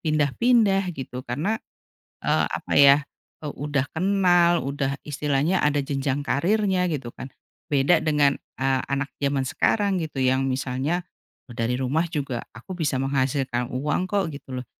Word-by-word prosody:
pindah-pindah 195 - +2
gitu 125 -2 -6
karena, 160 - -1 0.7
eee, - - +2
apa - - -4
ya, 140 0 +8 0.5
udah 145 -2 -2
kenal, 175 -2 +3
udah 140 0 -2
istilahnya 150 +4 0
ada 150 0 +2
jenjang 140 0 -2
karirnya 185 +5 +1
gitu 135 -7 -4
kan. 130 - -8 0.4
Beda 145 +4 +3
dengan, 150 -2 +3 0.2
eee, 130 0 +1
anak 140 +1 -2
jaman 140 -1 0
sekarang 200 - +1
gitu 155 -3 -6
yang 130 +1 +2
misalnya, 135 +7 -2 0.4
e 120 - -11
dari 115 +2 -1
rumah 135 +5 +1
juga 140 -7 -3
aku 125 +12 -9
bisa 150 -6 -1
menghasilkan 130 -2 -1
uang 145 +7 -1
kok 200 -3 +1
gitu 130 -2 -7
loh. 125 - -8
145 Hz, 140 wpm, -24 LUFS, 135-175 Hz, 0.7 s, ya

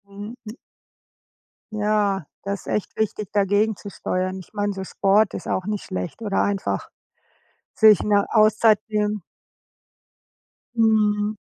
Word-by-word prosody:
Mhm. 205 +3 -9
Hm. 215 - -6 1.2
Ja, 205 -4 0 0.2
da 200 - -3
ist 200 - -5
echt 210 - -3
wichtig, 215 -2 -2
dagegenzusteuern. 200 -2 0
Ich 185 - -14
meine, 205 -1 -1
so 190 0 -5
Sport 200 +2 +2
ist - - -6
auch 185 - -1
nicht 210 -1 -3
schlecht 90 - -5
oder 205 -3 0
einfach 200 -1 -2 0.8
sich 215 -4 +6
'ne 205 -1 +2
Auszeit 215 0 +5
nehmen. 210 -1 -1 1.5
Mhm. 215 -2 +2
210 Hz, 120 wpm, -23 LUFS, 195-215 Hz, 1.5 s, sich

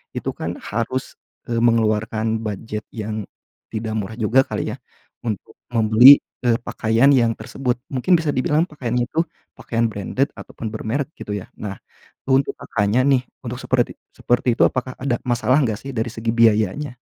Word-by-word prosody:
Itu, - - -2
kan, - - -4
harus 115 +4 -3 0.3
e 120 - -4
mengeluarkan 110 -1 +1
bujet 105 0 -4
yang 110 -1 -4 0.5
tidak 110 0 -4
murah 110 +1 -4
juga 120 +3 +4
kali, - - -3
ya, - - -8 0.4
untuk 110 -5 -5 0.2
membeli, 120 +4 +8 0.3
eee, 115 -1 +4
pakaian 115 +5 +2
yang 115 -4 +3
tersebut, 125 -3 -2 0.2
mungkin 155 +8 +3
bisa 160 -3 -1
dibilang 150 +5 +2
pakaian 130 -8 -3
itu 125 +7 +1 0.4
pakaian 115 0 -1
branded 110 +7 -1
ataupun 115 - -8
bermerek, 135 +8 -3
gitu, 105 0 -4
ya. 95 - -7 0.2
Nah, 100 -2 -5 0.5
untuk 135 +1 +3
Kakaknya, 105 +4 +1
nih, 135 -3 +3 0.2
untuk 120 +1 -4
seperti 125 -2 +1 0.2
seperti 120 0 +1
itu, - - +5
apakah 130 0 -3
ada 130 -2 -1
masalah 125 +2 +2
enggak, 110 -5 +1
sih, 135 - -6
dari 115 -1 -1
segi 115 0 -2
biayanya? 115 +4 +2
115 Hz, 160 wpm, -21 LUFS, 110-130 Hz, 0.5 s, membeli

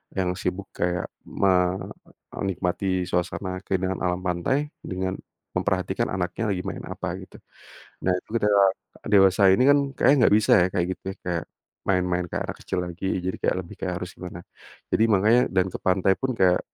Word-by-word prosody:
yang 90 -2 0
sibuk 95 +1 -3
kayak 90 0 -1 0.2
me 100 -1 +2 0.8
menikmati 95 -1 -1
suasana 90 +1 -2
keindahan 95 0 -1
alam 90 0 0
pantai 90 +12 0 0.2
dengan 95 0 -3 0.4
memperhatikan 95 -3 0
anaknya 95 +4 -1
lagi 90 - -3
main - - -5
apa - - -5
gitu. - - -13 0.7
Nah 90 - +3
itu - - -11
ketika 105 -1 +2 0.5
dewasa 95 -2 +5
ini 110 - +3
kan 145 - +7 0.2
kayaknya 135 +4 +5
enggak 100 - +5
bisa 110 - +1
ya - - +1
kayak 90 - +1
gitu - - -21
ya - - -20
kayak, 85 -2 -1 0.4
main-main 90 -2 +1
kayak - - -3
anak - - -11
kecil 95 - -2
lagi 90 +2 -6 0.2
jadi 95 +1 -2
kayak - - +1
lebih 85 - -12
kayak 90 -1 -2
harus 90 +1 -5
gimana. 90 -1 -7 0.5
Jadi 110 - +3
makanya 110 +3 +4
dan 95 -1 +4
ke - - -4
pantai 95 +1 +3
pun 130 -1 0
kayak, 90 -1 +4
95 Hz, 170 wpm, -25 LUFS, 90-100 Hz, 0.8 s, kan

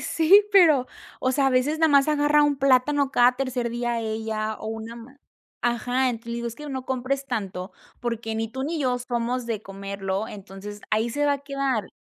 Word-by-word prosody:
sí, 365 +6 +5
pero, 315 -10 +6 0.3
o 255 - +1
sea, 270 0 +3
a - - -1
veces, 265 +5 +1
más 280 -1 +4
agarra 295 0 +3
un 290 -1 +2
plátano 275 +1 +3
cada 245 -1 +5
tercer 255 -3 -2
día 240 0 -2
ella 220 -1 -3
o - - -8
una 225 +1 -6
man 250 +4 -13 0.5
ajá, 245 +2 +1
entonces, 235 -1 -5
le - - -2
digo: 235 0 -3
"Es 230 - -8
que 300 0 -8
no 260 -2 -4
compres 265 +2 -2
tanto, 195 -6 -4 0.3
porque 230 -2 -3
ni 225 0 -2
tú 265 +4 -5
ni 320 +2 -2
yo 250 -2 +1
somos 245 0 -2
de 220 -3 -3
comerlo, 195 +1 -4
entonces 205 0 -9
ahí 220 +2 +1
se 290 +5 -1
va 285 - +3
a - - -5
quedar". 275 -6 -2
245 Hz, 200 wpm, -24 LUFS, 225-275 Hz, 0.5 s, pero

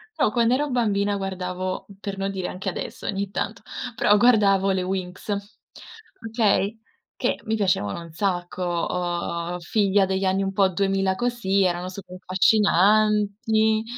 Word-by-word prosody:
però 255 -9 +2
quando 235 +1 +3
ero 295 +1 -1
bambina 205 -4 +1
guardavo 185 -1 -4
per 195 -1 -5
non 195 0 -2
dire 190 -2 -3
anche 190 +1 -4
adesso, - - -6
ogni 200 -1 -2
tanto, - - -4 0.3
però 205 -1 +4
guardavo 200 -4 +4
le 190 -1 0
Winx, 185 +1 -4 1.0
okay? 220 -1 +1 0.4
Che - - -1
mi 220 0 0
piacevano 185 - 0
un 165 -1 -11
sacco, 180 0 -2 0.3
uhm, 175 0 -3
figlia 195 +2 +2
degli 190 0 -1
anni 190 +1 +1
un 195 - -1
po' 195 0 +3
2000 195 0 0
così, 200 -5 0
erano 180 0 0
super 185 -1 -9
affascinanti, 210 +3 +3
195 Hz, 140 wpm, -24 LUFS, 185-210 Hz, 1.0 s, però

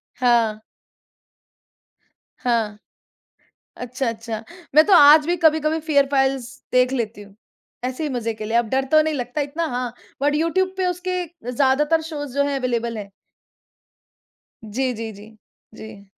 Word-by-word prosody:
हाँ। 235 -4 +2 1.8
हाँ। 225 -4 0 1.0
अच्छा, 250 +1 -3
अच्छा। 225 -1 -5 0.3
मैं 310 +1 +8
तो 405 - +2
आज 300 0 +8
भी 350 +1 +1
कभी-कभी 315 -1 +2
फियर 285 -3 +4
फ़ाइल्स 270 -2 +1 0.3
देख 250 +1 +3
लेती 225 -4 -3
हूँ, 200 -1 -16 0.5
ऐसे 255 +4 -3
ही 300 - -1
मज़े 230 -3 -2
के 215 0 -7
लिए। 225 +2 -1
अब 235 -2 +2
डर 265 +2 0
तो 310 - +7
नहीं 310 0 -1
लगता 250 +2 -3
इतना, 300 +4 -2
हाँ, 245 -4 -3 0.3
बट 290 +1 +2
यूट्यूब 370 +4 +1
पे 375 -1 0
उसके 360 0 -2 0.3
ज़्यादातर 295 +5 +2
शोज़ 290 -4 -6
जो 280 - +2
हैं, 280 -1 -1
अवेलेबल 235 -3 -2
हैं। 200 -1 -8 1.5
जी, 250 +4 -2
जी, 225 0 -6
जी। 215 +2 -14 0.4
जी। 215 -3 -11
260 Hz, 150 wpm, -22 LUFS, 230-305 Hz, 1.8 s, मैं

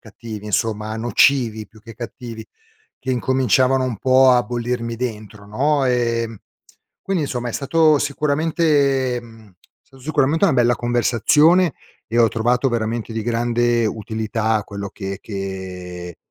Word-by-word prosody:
cattivi 110 -1 -9
insomma, 110 +1 -1
a 110 - -4
nocivi 120 -1 +2
più 110 -2 -19
che 115 0 -12
cattivi, 115 -2 -8 0.6
che 130 - -4
incominciavano 130 +1 +2
un 125 -4 -2
po' 130 0 +5
a 125 -1 +4
bollirmi 120 -1 -3
dentro 110 -3 -6
no. 140 +7 +1
Ehm, 115 -3 0 0.6
quindi 185 -6 -1
insomma 125 -3 -3
è - - -5
stato 155 +1 +3
sicuramente 145 -3 +1
mhmm, 115 -3 -16 0.3
sta 135 - -20
sicuramente 150 +4 +1
una 165 - +4
bella 120 -1 +3
conversazione 130 - +3 0.3
e 115 +1 -1
ho 115 -1 +6
trovato 120 +4 +1
veramente 115 -1 -2
di 110 - -2
grande 120 0 +1
utilità 110 0 -2
quello 100 -1 -6
che 95 -1 -6
che 90 -3 -7
120 Hz, 135 wpm, -20 LUFS, 110-130 Hz, 0.6 s, ho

